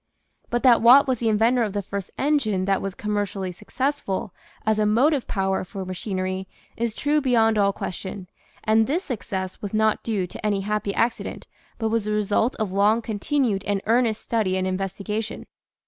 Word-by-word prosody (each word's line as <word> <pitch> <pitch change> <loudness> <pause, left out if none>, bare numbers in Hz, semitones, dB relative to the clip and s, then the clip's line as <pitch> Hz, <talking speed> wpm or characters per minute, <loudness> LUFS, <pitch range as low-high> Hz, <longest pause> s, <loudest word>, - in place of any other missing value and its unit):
But 240 0 -1
that 245 -3 +6
Watt 260 +5 +8
was 255 -3 0
the 230 - +1
inventor 225 +4 +3
of 210 -4 -1
the 205 -1 -2
first 195 0 -5
engine 240 -10 +1
that 195 -1 +1
was 195 -2 -4
commercially 205 -3 -2
successful 210 0 -3 0.3
as 215 0 +2
a 210 - +3
motive 260 +6 +2
power 190 -1 0
for 190 +1 -7
ma 185 - -4
chinery 185 0 -3 0.3
is 230 -1 -2
true 295 +1 +1
beyond 225 -5 +3
all 200 -1 +4
question, 190 0 -6 0.4
and 220 0 +3
this 330 +8 0
success 190 - -4
was 205 0 -4
not 215 0 +2
due 210 -5 -1
to 180 - -10
any 205 -2 +1
happy 210 +1 -2
a.rn'Hent. 230 +3 -1 0.4
3 225 - 0
hvrhjyas 210 -2 0
thp 220 +3 +3
re^ilf - - -18
nf 215 -4 -2
long 205 +4 +3
rpntin 225 +7 -1
ued 200 -4 -1
and 205 -1 +1
earnest 230 -1 +2
study 210 -5 0
and 185 - 0
investigation. 195 +3 -3
210 Hz, 185 wpm, -24 LUFS, 195-230 Hz, 0.4 s, Watt